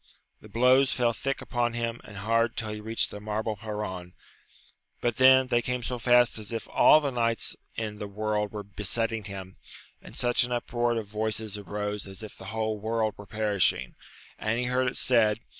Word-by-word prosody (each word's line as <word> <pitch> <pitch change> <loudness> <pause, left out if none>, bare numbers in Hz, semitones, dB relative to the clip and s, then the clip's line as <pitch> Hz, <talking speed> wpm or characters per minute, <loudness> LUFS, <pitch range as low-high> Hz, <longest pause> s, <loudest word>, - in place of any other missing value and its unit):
The - - -13
blows 130 +3 +4
fell 120 -2 +1
thick 135 +4 -3
upon 120 -1 -1
him 115 0 -3
and 105 - -11
hard 115 +3 +1
till 110 -4 -2
he 105 - -5
reached 110 +1 0
the 105 - -7
marble 110 +1 -2
perron, 105 -4 -5 0.9
but 120 -2 -1
then 130 0 +7
they 120 -1 +3
came 125 +1 -2
so 125 +1 -3
fast 120 0 +4
as 105 0 -6
if 115 -1 -4
all 155 - +7
the 145 -3 -2
knights 115 -2 0 0.2
in 105 -2 -4
the 105 - -4
world 105 0 -1
were 105 -1 -5
besetting 105 +2 -2
him, 95 -2 -8 0.4
and - - -12
such 120 0 +3
an 125 - -3
uproar 120 -1 0
of 110 - -3
voices 110 0 -2
arose 105 0 -4
as 95 +2 -8
if 110 - -8
the 95 - -11
whole 110 +1 -2
world 110 0 0
were 100 - -12
perishing, 105 -3 +1 0.5
and 110 +2 0
he 125 - 0
heard 125 +1 +1
it 125 - -2
said. 115 -4 +3
110 Hz, 190 wpm, -28 LUFS, 105-120 Hz, 0.9 s, then